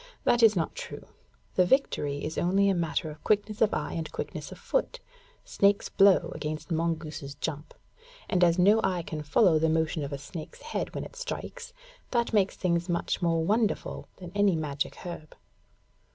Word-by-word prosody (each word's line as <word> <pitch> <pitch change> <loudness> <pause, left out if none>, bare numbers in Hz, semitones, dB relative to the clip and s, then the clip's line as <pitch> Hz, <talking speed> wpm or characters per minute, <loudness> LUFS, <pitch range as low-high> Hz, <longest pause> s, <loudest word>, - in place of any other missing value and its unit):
That 240 - +3
is 220 -2 +7
not 165 -3 -1
true. - - -8 0.5
The 185 - +4
victory 150 - +1
is 155 - -4
only 195 +3 +3
a - - +3
matter 165 -2 -1
of 150 0 -13
quickness 210 0 0
of 220 - +5
eye - - -2
and 165 -2 -4
quickness - - -5
of - - -9
foot, - - -1 0.5
snake's 200 0 +2
blow 195 -1 +4
against 155 +2 -5
mongoose's 160 -4 -2
jump, 150 -1 -5 0.5
and 180 -1 +2
as 170 0 +4
no 205 +5 +5
eye 180 -2 0
can 155 -2 -5
follow 155 +3 +4
the 160 +1 +2
motion 160 -1 0
of 140 - -5
a 140 - -3
snake's 155 +3 -9
head - - -4
when - - -3
it - - -10
strikes, - - -6 0.4
that 235 -2 0
makes 200 -3 +3
things 175 -1 0
much 170 +2 -1
more 165 -2 +1
wonderful 215 +3 0
than 180 -2 -9
any 205 -3 +3
magic 150 -3 -2
herb. 170 -4 -8
175 Hz, 180 wpm, -28 LUFS, 155-205 Hz, 0.5 s, is